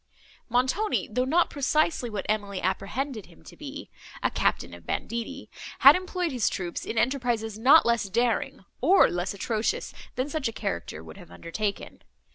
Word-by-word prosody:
Montoni, 260 - +1
though 250 +3 +1
not 335 +6 +2
precisely 290 -2 +1
what 210 -3 -4
Emily 205 -2 -1
apprehended 215 +6 -2
him 80 - -19
to - - -13
be—a - - -6
captain - - 0
of 85 -1 -13
banditti—had 235 0 +2
employed 365 -2 -2
his 245 -4 +1
troops 175 -3 -4
in 225 - -4
enterprises 235 -3 0
not 280 +7 +7
less 235 -4 +1
daring, 230 -2 0 0.2
or 360 +9 +5
less 175 +2 -2
atrocious, 215 +2 -2 0.2
than 255 +2 -1
such 295 -3 -2
a - - -2
character 85 - -4
would 80 -1 -12
have - - -13
undertaken. 185 - -4
230 Hz, 150 wpm, -27 LUFS, 200-270 Hz, 0.2 s, not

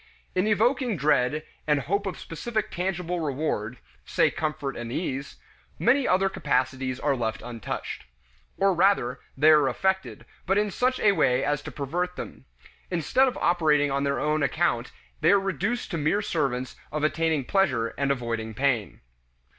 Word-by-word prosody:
In 185 +3 +1
evoking 235 +1 +2
dread 150 +1 +2 0.2
and 150 -2 +3
hope 200 +9 -1
of 190 - -4
specific 215 +6 -4
tangible 180 -1 -2
reward 135 -7 -2 0.3
say - - +2
comfort 150 -3 -3
and 120 0 -6
ease 140 -2 -3 0.4
many 260 +3 +3
other 190 +1 +3
capacities 130 -5 -1
are 145 -2 +1
left 110 -3 -3
untouched. 115 - -5 0.5
Or 195 0 +3
rather, 170 -9 +2 0.2
they 155 +3 +6
are 150 -3 +5
affected, 190 +8 -1 0.2
but 195 +2 +3
in 210 -1 +1
such 255 +5 +1
a 205 - +5
way 135 -8 +2
as 145 0 0
to - - -8
pervert 175 +6 -3
them. - - -8 0.4
Instead 185 - +2
of 255 - -2
operating 150 -5 +3
on 140 0 0
their 140 0 0
own 155 +1 +1
account 140 - 0 0.3
they - - +3
are 200 - +5
reduced 195 - -2
to 165 - -2
mere 165 +8 +1
servants 130 -8 -1 0.2
of 150 0 -2
attaining 155 -2 +1
pleasure 130 - +1
and 140 0 -2
avoiding 115 -4 -2
pain. 125 -5 0
155 Hz, 160 wpm, -26 LUFS, 135-190 Hz, 0.5 s, they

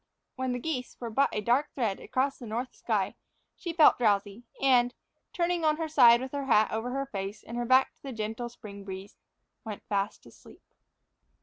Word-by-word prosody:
When 260 -1 -2
the 245 - -1
geese 255 -2 -4
were 235 -2 -5
but 275 +5 +3
a 210 - -2
dark 250 +7 +2
thread 220 -7 -1
across 270 +2 -1
the 240 - -8
north 240 +4 -3
sky, - - -1 0.4
she 345 - -5
felt 320 -5 +6
drowsy 205 0 +1
and, 245 -2 +3 0.4
turning 345 -1 0
on 305 -1 +3
her 325 -1 -2
side 245 -6 +6
with 260 0 -5
her 280 -1 -3
hat 220 -4 +4
over 225 +3 -2
her 275 +2 -2
face 200 -4 -6
and 235 - -8
her 240 0 -1
back 260 +2 +4
to - - -40
the 275 - -6
gentle 225 +1 -4
spring 200 -4 -11
breeze, 195 +1 -8 0.5
went 215 -3 -7
fast 200 0 -2
asleep. - - -17
245 Hz, 195 wpm, -29 LUFS, 215-270 Hz, 0.5 s, felt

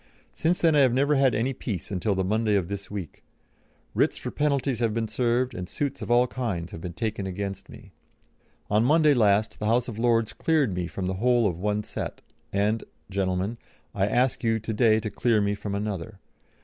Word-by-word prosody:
Since 170 +3 0
then 165 -2 +4
I - - +5
have 130 -3 +4
never 140 +3 +3
had 135 -3 +3
any 120 +5 0
peace 105 -9 -5
until 100 +2 0
the 95 - 0
Monday 105 +2 +1
of 95 -3 0
this 100 -1 -5
week. 100 -6 -7 0.7
Writs - - +2
for - - -5
penalties 140 -4 0
have 115 -2 0
been 115 -1 -1
served, 125 +2 0
and 90 -5 -6
suits 140 -3 -3
of - - -5
all 120 +1 +5
kinds 110 -10 -3
have 80 - -8
been 85 0 -5
taken 110 -1 -3
against 100 +1 -5
me. - - -13 0.8
On 105 +2 +3
Monday 150 +3 +5
last 105 -3 +2
the 105 - -1
House 120 +2 +2
of 110 -3 -6
Lords 115 -2 +2
cleared 150 - +1
me 90 -1 -2
from 95 +2 -5
the 95 - -1
whole 120 -1 +3
of 85 -3 -3
one 105 +2 0
set, - - -6 0.3
and, 105 +3 +1 0.3
gentlemen, 95 +3 -1 0.3
I 100 -2 +1
ask 125 +4 +1
you 115 -1 +2
to 110 +1 -4
day 110 0 +4
to 110 -1 -4
clear 115 -3 +2
me 100 0 +1
from 105 -1 -4
another. 100 -1 -4
110 Hz, 205 wpm, -26 LUFS, 100-125 Hz, 0.8 s, I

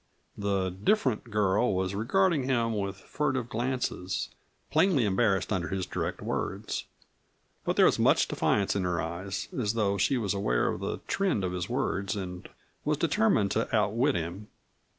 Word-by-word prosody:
The 100 -2 0
"different" 120 - +1
girl 105 +1 +2
was 95 +1 -1
regarding 145 - +2
him 115 -4 +1
with 100 -1 -2
furtive 130 -5 -2
glances, 120 -7 -2 0.4
plainly 165 - +4
embarrassed 100 0 +2
under 90 -4 -1
his 95 +2 -2
direct - - -3
words. - - -3 0.8
But - - 0
there - - +6
was - - +3
much - - +4
defiance 100 -1 +1
in 100 - 0
her 90 -1 0
eyes, 90 +3 -4
as 110 -4 0
though 100 -3 +1
she 115 +8 +2
was 105 -5 0
aware - - +1
of - - -3
the - - -4
trend 190 - 0
of 90 - -1
his 90 -1 -3
words 105 -7 -1
and 90 -3 -6 0.3
was - - +1
determined 105 -2 +2
to 115 +1 0
outwit 115 +7 +2
him. 85 +6 -4
100 Hz, 160 wpm, -29 LUFS, 95-120 Hz, 0.8 s, there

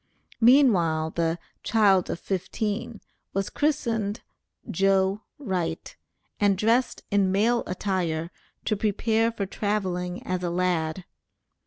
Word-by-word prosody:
Meanwhile, 190 - +4
the 165 0 0 0.2
"child 200 -5 +3
of - - -3
fifteen" 205 +4 -3 0.3
was 195 0 -1
christened 235 -8 0 0.5
"Joe 195 +2 +2 0.2
Wright," 180 - -3 0.4
and 200 -2 +3
dressed 230 +5 +1
in 200 -2 +3
male 230 +5 +2
attire 180 -3 -2 0.3
to 215 - +1
prepare 220 +2 +1
for 210 -3 -3
traveling 185 -3 -2
as 185 0 -2
a 175 - 0
lad. 175 -1 -1
195 Hz, 110 wpm, -26 LUFS, 180-220 Hz, 0.5 s, Meanwhile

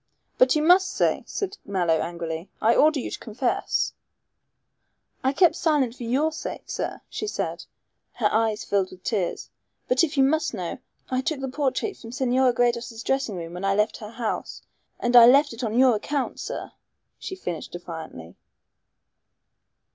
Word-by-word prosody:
"But 255 +3 +5
you 305 - +2
must 365 +3 +5
say," - - +1
said 400 0 -4
Mallow 175 -5 +1
angrily. 170 0 -4
"I 225 +2 +4
order 305 +3 +4
you - - -5
to - - -5
confess." 240 +3 -1 1.3
"I 265 - +3
kept 330 +3 +4
silent 295 -9 +1
for - - -14
your 280 +7 +1
sake, 315 - -6
sir," - - -4
she 425 - -5
said, - - -3 0.5
her 225 -4 +1
eyes 220 -1 +1
filled 195 -2 0
with 185 0 -14
tears, 195 -7 -2 0.4
"but 255 +4 +3
if 310 -2 -1
you 270 - +6
must 305 -2 +1
know, 180 -4 -4 0.3
I 255 0 +1
took 295 +1 -2
the 270 - -3
portrait 285 +9 -1
from 225 - -10
Senora 255 0 +2
Gredos' 235 -1 -1
dressing 270 -6 0
room 170 -1 -6
when 180 +2 -6
I 195 0 +2
left 210 +1 +1
her 210 - -8
house. 230 0 -4 0.4
And 240 0 0
I 235 -1 +11
left 280 +2 +5
it 230 +3 -7
on 225 0 -1
your 255 -3 +5
account, 280 +5 -3
sir," - - -5 0.5
she 375 - -6
finished 175 - -5
defiantly. 160 - -8
245 Hz, 170 wpm, -25 LUFS, 205-280 Hz, 1.3 s, I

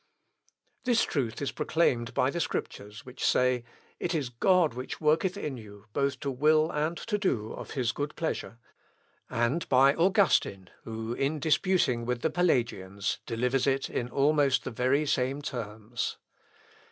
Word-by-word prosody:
This 240 -2 +3
truth 125 -3 -2
is 140 - -1
proclaimed 120 -8 0
by 130 - +2
the 170 - -3
Scriptures, 105 -5 -4
which 125 0 -8
say, 125 -1 +2 0.4
"It 175 -1 -1
is 140 -6 -1
God 170 +6 +3
which 125 +2 -6
worketh 165 +5 +2
in 150 -9 -4
you, 105 -2 -12
both 140 -1 0
to 140 - -2
will 155 +4 +3
and 155 +3 -1
to 210 -2 -2
do 115 - -1
of - - -8
his 120 -3 +1
good 145 +3 -4
pleasure," 160 -7 -3 0.7
and 120 +8 0
by 135 +2 +6
Augustine, 170 - +2
who, 110 +1 -4
in 140 +5 -1
disputing 155 -5 +2
with 125 0 -2
the 160 - +1
Pelagians, 120 - 0
delivers 125 +3 0
it 135 0 0
in 120 - -2
almost 140 -2 +2
the - - -5
very 130 +6 +1
same 135 0 0
terms. 115 -4 -4
135 Hz, 155 wpm, -29 LUFS, 120-155 Hz, 0.7 s, by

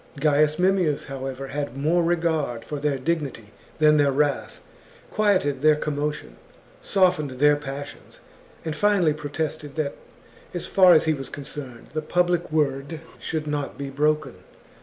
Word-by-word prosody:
Gaius 150 +1 +3
Mem 190 +2 +3
XXXIII. 175 -4 +2
mius, - - -9
however, 135 0 -5
had 145 -2 -4
more 160 +5 +2
regard 160 -8 0
for 150 - -5
their 145 -1 0
dignity 135 -7 -3 0.3
than 150 -1 +5
their 145 -1 +4
wrath, 145 +1 0 0.5
quieted 185 -10 +2
their 155 0 +5
commotion, 150 - -3 0.4
softened 180 -6 +2
their 150 +1 +6
passions, 145 0 -8 0.5
and 160 -2 -2
finally 195 -4 +3
protested 150 0 -4
that, 150 -3 -1 0.6
as 175 - -2
far 185 -3 +6
as 155 - +5
he 160 - +2
was 135 -3 -6
concerned, 135 -4 -8
the 155 - -1
public 175 +1 0
word 145 0 -1 0.2
should 155 -1 -3
not 145 -2 -3
be 140 -1 -5
broken. 150 +2 0
150 Hz, 150 wpm, -24 LUFS, 140-160 Hz, 0.6 s, their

